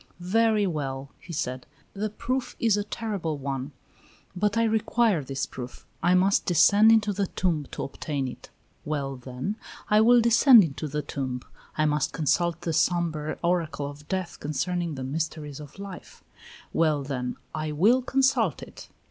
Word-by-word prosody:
"Very 225 -2 +4
well," 140 -5 -3
he 175 - -11
said. 130 -5 -3 0.3
"The 210 +2 -2
proof 240 +4 -3
is 225 -3 +3
a 205 - -1
terrible 200 -8 -3
one, 135 0 -4 0.6
but 205 +3 0
I 230 - +4
require 220 -5 +2
this 135 +1 -3
proof. 125 -1 -9 0.2
I 175 +2 +4
must 190 +2 +3
descend 200 +5 +6
into 215 -2 +3
the 200 0 -1
tomb 165 -7 -1
to - - -5
obtain 140 -1 -3
it: 125 - -9 0.3
well, 140 -3 -3
then, 130 - -5 0.3
I 210 +1 +6
will 240 +2 +6
descend 235 0 +7
into 155 -1 -4
the 150 +1 -3
tomb. 130 -3 -4 0.3
I 155 - +3
must 150 0 0
consult 170 +2 +1
the 165 - -2
sombre 160 -2 0
oracle 165 -4 0
of 145 +1 -11
death 185 -2 -3
concerning 170 +2 -2
the 130 - -5
mysteries 150 +1 -4
of 150 +2 -11
life: 195 -2 -10 0.5
well, 155 -3 +2
then, 125 -3 -3 0.2
I 155 0 -3
will 210 - +4
consult 260 - +1
it." - - -12
165 Hz, 160 wpm, -26 LUFS, 145-210 Hz, 0.6 s, descend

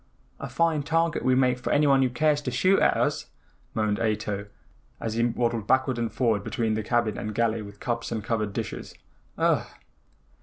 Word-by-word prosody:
"A 140 - -6
fine 155 +4 +1
target 165 +2 0
we 130 0 +3
make 125 -1 +2
for - - -3
anyone 140 -2 +4
who 130 - +3
cares 145 +4 +1
to 140 - -3
shoot 185 +11 +3
at - - +3
us," - - 0 0.5
moaned 105 -1 0
Ato, 105 -2 -2 0.5
as 110 - -3
he 115 +1 +1
waddled 115 -2 0
backward 130 -1 +2
and 115 -1 -1
forward 110 -5 +1
between 110 0 -1
the 110 - -1
cabin 115 0 0
and 105 -1 -5
galley 115 -1 +1
with 100 -1 -11
cups 120 -1 -3
and 110 -2 -3
covered 110 -2 -1
dishes. - - -5 0.4
"Ugh!" - - +2
120 Hz, 185 wpm, -26 LUFS, 110-130 Hz, 0.5 s, anyone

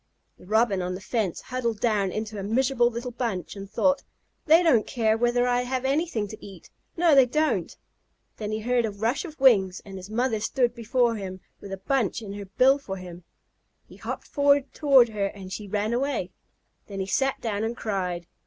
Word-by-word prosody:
The - - -16
Robin 215 -2 +2
on 180 0 -3
the - - -6
fence 200 -2 -2
huddled 235 -4 -3
down 205 -5 +1
into 215 0 -4
a - - -3
miserable 245 +3 +2
little 240 +1 -5
bunch, 230 -8 -3
and 195 -1 -8
thought: 280 +5 +2 0.5
"They 325 +3 +6
don't 250 -11 +3
care 225 -4 +1
whether 240 +1 +2
I 245 0 +2
ever 250 - -5
have 260 0 -1
anything 275 -6 0
to 215 - -10
eat. 195 -4 -12 0.3
No, 335 -2 +4
they 270 -2 +7
don't!" 305 +5 0 0.6
Then 210 -1 -4
he 215 0 -2
heard 245 +1 +1
a 220 - 0
rush 225 - -1
of 315 -3 -10
wings, 200 -8 +4
and 195 -1 -8
his 185 +1 -9
mother 230 0 0
stood 240 +2 0
before 235 0 +1
him 190 -2 -6 0.2
with 200 - -10
a 195 - -4
bunch 230 +1 -1
in 200 -2 -7
her 205 0 -7
bill 255 +8 +3
for 195 -8 -6
him. 180 -1 -10 0.6
He - - -15
hopped - - -7
toward 280 -2 +4
her 205 -2 -1
and 190 -2 -9
she 210 0 -6
ran 210 +3 -1
away. 245 -7 -1 0.6
Then 195 -2 -6
he 190 - -1
sat 270 +7 0
down 215 -2 -2
and 230 +2 -3
cried. 180 -5 -3
225 Hz, 200 wpm, -26 LUFS, 200-255 Hz, 0.6 s, they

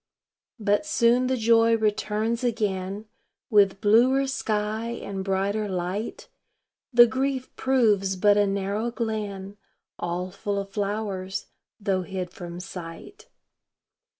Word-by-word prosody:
But 205 +2 +2
soon 245 -2 +3
the 260 0 0
joy 230 0 +4
returns 220 +2 0
again 205 -3 -2 0.5
With 200 -2 +4
bluer 245 +6 +4
sky 220 -4 -2
and 200 -5 -5
brighter 200 +2 -1
light; 185 +4 -3 0.6
The 240 -1 +8
grief 260 +2 -2
proves 215 -7 +2
but 205 +2 +4
a 205 0 +3
narrow 200 +3 -1
glen 210 -4 -4 0.4
All 175 +2 -3
full 200 +1 -3
of 195 0 -4
flowers, 200 -2 -3 0.3
though 195 -2 0
hid 185 -1 -5
from 175 -1 -8
sight. 180 - -9
205 Hz, 115 wpm, -25 LUFS, 195-230 Hz, 0.6 s, The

